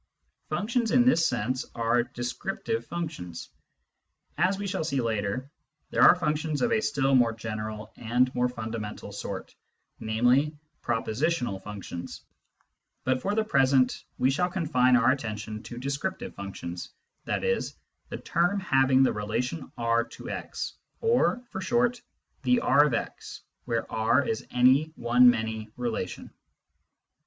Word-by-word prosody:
Functions 225 +9 0
in 245 +1 +4
this 210 -10 +4
sense 125 +1 -1
are 115 +1 +2
descriptive 120 - -3
functions. 155 - -5 0.9
As 185 +5 +2
we 200 - -4
shall 185 -4 -2
see 140 -4 -1
later, 115 +3 -2 0.4
there - - +1
are - - +9
functions 155 -3 -1
of 235 - +2
a 220 -1 +3
still 135 -8 +1
more 120 -3 +4
general 110 -1 -6
and 125 +2 +1
more 125 0 +1
fundamental 110 -3 -6
sort, 100 -1 -6 0.5
namely, 125 +7 +2 0.2
propositional 120 - -1
functions; 95 -4 -7 0.8
but 130 0 +1
for 200 +1 -1
the 220 - +2
present 135 - +3
we 130 - +3
shall 180 +6 +1
confine 130 -8 +3
our 125 +1 +4
attention 110 -4 -4
to 120 - -9
descriptive 140 +9 -3
functions, 90 -3 -6 0.4
i.e. 475 0 +1 0.2
" - - -44
the - - -4
term 175 +4 +1
having 135 -6 +4
the - - +3
relation 125 +8 -3
R 115 0 +2
to - - -9
x" - - -5 0.3
or, 455 - +2
for 190 - -4
short, 240 +5 +1 0.2
" - - -45
the 250 -1 +3
R 145 - +5
of 125 - 0
x," - - -5 0.2
where 115 -2 -1
R 115 +5 +2
is 110 - -2
any 130 +4 +5
one 120 +1 +6
many 110 -2 -1
relation. 115 -7 -4
125 Hz, 140 wpm, -27 LUFS, 115-160 Hz, 0.9 s, are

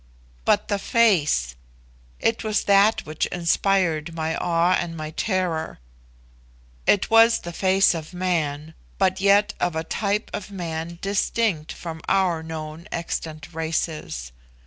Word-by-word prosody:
But 205 - +2
the 205 -1 -1
face! 170 - +2 0.6
it 225 +1 0
was 215 -1 0
that 200 +2 +4
which 155 0 -2
inspired 170 -2 +1
my 160 0 -1
awe 170 +1 +1
and 170 -2 -2
my 155 0 -5
terror. 175 -3 -1 1.1
It 205 - +3
was 225 +1 +7
the 175 - -7
face 190 +2 +3
of 160 -2 -6
man, 160 -4 -2 0.2
but 190 -1 +1
yet 200 +1 +4
of 175 -2 0
a 160 - -1
type 205 +5 -2
of 210 - -5
man 170 -3 -5
distinct 195 -4 0
from 165 -2 -7
our 185 -4 +2
known 160 +2 -7
extant 165 -1 -5
races. 160 - -3
170 Hz, 130 wpm, -23 LUFS, 160-195 Hz, 1.1 s, was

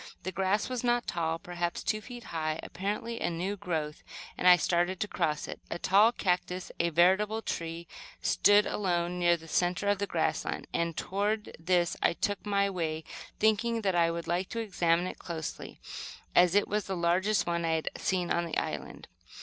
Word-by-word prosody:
The 185 - -3
grass 190 +3 +1
was 255 -1 -3
not 240 0 +2
tall, 165 -1 -1
perhaps 175 0 -3
two 215 - 0
feet 245 +1 -9
high, 155 -1 -1
apparently 210 +5 -4
a - - +1
new 180 +4 -2
growth, 160 -5 -3 0.3
and 180 - +1
I 180 - +10
started 175 +1 +1
to 210 - -1
cross 155 -6 -1
it. - - -7
A - - -3
tall 200 +6 +5
cactus, 180 -3 -1
a 170 - +2
veritable 190 +7 +3
tree, 165 0 -4 0.3
stood 205 0 +4
alone 180 -2 -1
near 175 -1 +4
the 165 0 -14
centre 180 +4 0
of 205 -1 +2
the 200 - -1
grassland, - - -1
and 170 -2 -1
toward 210 +3 -1
this 175 +1 +2
I - - +3
took 205 +3 -2
my 200 -1 +2
way, 160 -4 -2 0.3
thinking 225 +2 +2
that 190 -2 +2
I 170 -1 +3
would 170 0 -3
like 175 +2 -1
to 230 - -3
examine 175 -5 +1
it 185 - -6
closely, 160 -3 -6 0.6
as 180 +1 +6
it 205 - +4
was 210 -1 -1
the 190 -1 -2
largest 175 +3 +2
one 170 0 -1
I 165 -1 +1
had 160 - -1
seen 180 -2 -1
on 170 0 +1
the 165 - -3
island. - - -4
180 Hz, 190 wpm, -30 LUFS, 170-205 Hz, 0.6 s, I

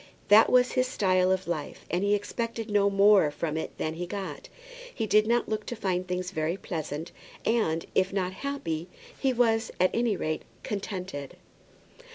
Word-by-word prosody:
That 210 +2 +7
was 250 0 +5
his 255 -1 +1
style 185 -5 +2
of 190 -1 0
life, 155 -4 -4
and 175 +3 0
he 205 +1 +3
expected 230 +1 -4
no 200 -1 +4
more 200 -4 +5
from 150 +1 -3
it 160 - -4
than 155 - -2
he 175 +2 -5
got. 195 +1 -6 0.4
He 225 - -2
did 215 0 +4
not 235 +1 +2
look 215 -1 -2
to 240 - -3
find 185 -4 -1
things 180 0 -3
very 160 0 -1
pleasant, 160 -2 -5 0.3
and, 210 -8 +1
if 190 0 +2
not 185 -2 -1
happy, 180 - -4 0.3
he 265 - +2
was, 230 -2 +2
at 185 +1 +4
any 230 -4 +1
rate, 155 0 -2 0.2
contented. 185 -8 -5
195 Hz, 175 wpm, -28 LUFS, 175-220 Hz, 0.4 s, That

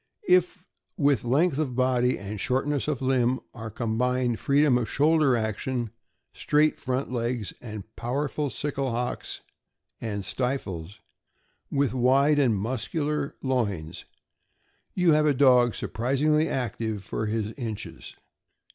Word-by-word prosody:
If 180 +1 +3 0.3
with 145 -5 +2
length 140 +5 +2
of 135 -6 -1
body 125 -1 +2
and 100 +1 -6
shortness 135 +5 0
of 140 -4 -2
limb 130 -1 +2
are 115 -2 -7
combined 120 +2 0
freedom 140 -1 +3
of 115 - -3
shoulder 150 -3 +3
action, 115 +2 -2 0.4
straight 150 +1 +2
front 130 0 -2
legs, 120 -3 -2
and 110 -4 -7
powerful 140 +4 -2
sickle 135 +2 -2
hocks 125 +1 -3 0.6
and 100 -3 -4
stifles, 100 -7 -3 0.7
with 140 -3 +1
wide 135 +4 +4
and 120 -7 +3
mus 115 +5 -3
cular 150 -2 -1
loins, 105 - -2 0.9
you 180 -3 +4
have 150 0 +4
a 145 - +3
dog 125 -3 +5
surprisingly 150 +6 +1
active 110 -4 -2
for 110 - -3
his 110 0 -1
inches. 110 - -7
125 Hz, 125 wpm, -26 LUFS, 115-145 Hz, 0.9 s, dog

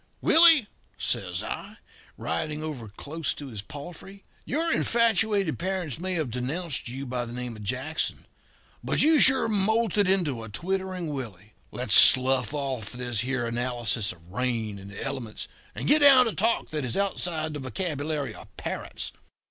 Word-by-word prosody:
"'Willie,' 325 -6 +6 0.3
says - - -2
I, - - -6 0.4
riding 150 - -3
over 140 -8 -6
close 145 +10 -4
to 145 -2 -8
his 110 -5 -7
palfrey, 175 - -10 0.2
'your 330 +4 0
infatuated 215 -6 +2
parents 180 -5 -3
may 185 +1 -2
have 155 -8 -2
denounced 135 +4 -3
you 135 +3 -6
by 125 -1 -3
the 120 - -8
name 125 -1 -5
of 110 - -11
Jackson, 130 +9 -3 0.6
but - - +2
you 310 -1 +5
sure 265 -3 +6
moulted 210 -1 +2
into 165 -11 +1
a 110 - -8
twittering 185 - -3
Willie 110 -6 -8 0.2
let - - -5
us - - +3
slough 130 -2 +6
off 135 -7 -3
this 125 -3 -3
here 125 -1 -1
analysis 120 -3 -1
of 85 -1 -16
rain 115 -3 -2
and 100 +1 -11
the 100 - -7
elements, 130 -5 -5 0.3
and - - -4
get 300 +2 +6
down 275 -3 +8
to 225 - -1
talk 225 +3 0
that 150 -3 -3
is 125 +4 -3
outside 175 -5 -1
the 150 - -5
vocabulary 145 - -3
of - - -13
parrots. - - -4
145 Hz, 165 wpm, -26 LUFS, 120-190 Hz, 0.6 s, down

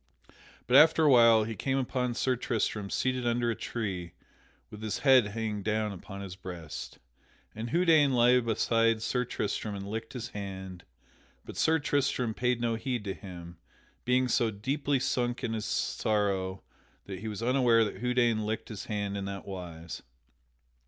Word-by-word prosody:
But 125 - +5
after 160 +2 +6
a 150 - +6
while 115 -3 +7
he 115 +1 -4
came 135 +6 -1
upon 125 -2 -1
Sir 130 +1 +1
Tristram 110 -4 -2
seated 130 +1 -1
under 120 0 +1
a - - -2
tree 95 -9 -4 0.6
with 105 - -10
his 110 -1 -2
head 130 -5 +6
hanging 105 -1 -3
down 110 +1 -1
upon 100 +1 -8
his 95 -2 -7
breast. 90 -5 -8 0.6
And 110 +2 -5
Houdaine 160 -4 +4
lay 125 +1 +5
beside 115 -1 +1
Sir 125 +2 0
Tristram 105 -2 -3
and 100 0 -6
licked 110 +2 -5
his 125 -1 -5
hand, 95 -4 -7 0.6
but - - -9
Sir 160 0 +3
Tristram 135 -6 0
paid 125 +1 0
no 120 -1 0
heed 120 -1 -3
to 100 -2 -3
him, 85 -3 -10 0.5
being 125 +1 +2
so 115 -1 +2
deeply 135 +6 -1
sunk 125 -1 -1
in 115 - -1
his 110 -1 -3
sorrow 100 -4 -1 0.4
that 95 -2 -7
he 110 - -6
was 110 +1 -5
unaware 120 -2 +4
that 105 - -6
Houdaine 120 -3 +2
licked 110 +1 -3
his 105 -4 -6
hand 100 -2 -3
in 100 -1 -3
that 100 -1 -6
wise. 85 -4 -7
115 Hz, 165 wpm, -29 LUFS, 100-125 Hz, 0.6 s, while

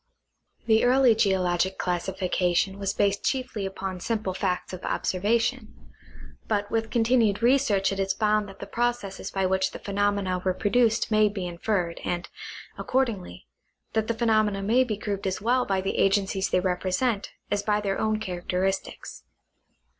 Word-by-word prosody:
The 220 -1 +4
early 250 -1 +5
geologic 190 -3 +1
classification 185 +1 0
was 195 -1 -1
based 200 0 0
chiefly 255 -7 -2
upon 190 -1 -5
simple 215 -1 -2
facts 185 0 -2
of 185 - -7
observation; 225 +5 0 0.7
but 205 -2 -1
with 225 0 0
continued 230 -3 +2
research 235 -7 +3
it 195 - -3
is 195 0 +1
found 210 -1 +1
that 195 - -12
the - - -7
processes 240 -5 -2
by 195 -1 -1
which 190 0 +1
the - - -5
phenomena 200 -2 0
were 185 -1 0
produced 225 +2 +2
may 215 -1 +4
be 200 -3 -4
inferred, 175 0 -2
and, 175 0 -2 0.5
accordingly, 225 - -2 0.5
that 220 -1 0
the 230 - -1
phenomena 215 -3 +1
may 235 +6 +4
be 220 -5 -3
grouped 200 -1 -3
as 190 - -2
well 245 +3 +1
by 195 -1 +1
the 195 - -2
agencies 195 -1 +2
they - - +2
represent 190 +4 -1 0.2
as 205 - +1
by 210 0 +1
their 195 -2 -2
own 215 0 0
character, 180 -2 -2
i 195 - +4
sties. 190 - -8
200 Hz, 160 wpm, -26 LUFS, 190-220 Hz, 0.7 s, early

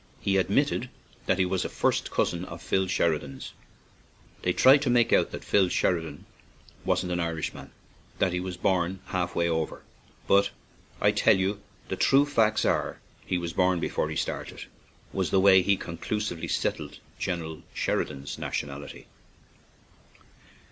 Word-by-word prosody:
He 95 -1 +1
admitted 95 - +1 0.4
that 95 - +3
he 95 - +3
was 90 0 -1
a - - -3
first - - 0
cousin 85 0 0
of 85 -1 -9
Phil 95 +2 0
Sheridan's. 80 -7 -1 0.9
"They 90 - +1
try 130 +9 +7
to 140 -2 -1
make 120 -1 +3
out - - +4
that - - -7
Phil 95 -3 +3 1.1
wasn't 90 -1 0
an 90 - -1
Irishman, 85 -2 -3 0.5
that 90 - +1
he 90 - 0
was 90 -1 -5
born 95 0 0
half 90 -3 -2
way 85 - +2
over, 80 -2 -2 0.4
but 100 0 +4 0.5
I - - +4
tell - - +4
you 100 +2 -1 0.3
the - - -2
true 140 +1 +4
facts 110 -6 +2
are - - +1
that - - -26
he 90 - +1
was 85 -1 -4
born 90 -1 +2
before - - -1
he - - -4
started," - - -4 0.5
was 95 -2 0
the 95 - +3
way 95 -1 +7
he 100 +1 +2
conclusively 85 +1 -4
settled - - -2 0.2
General 80 -4 -3
Sheridan's 70 0 -2
nationality. 70 0 -5
90 Hz, 150 wpm, -27 LUFS, 85-100 Hz, 1.1 s, try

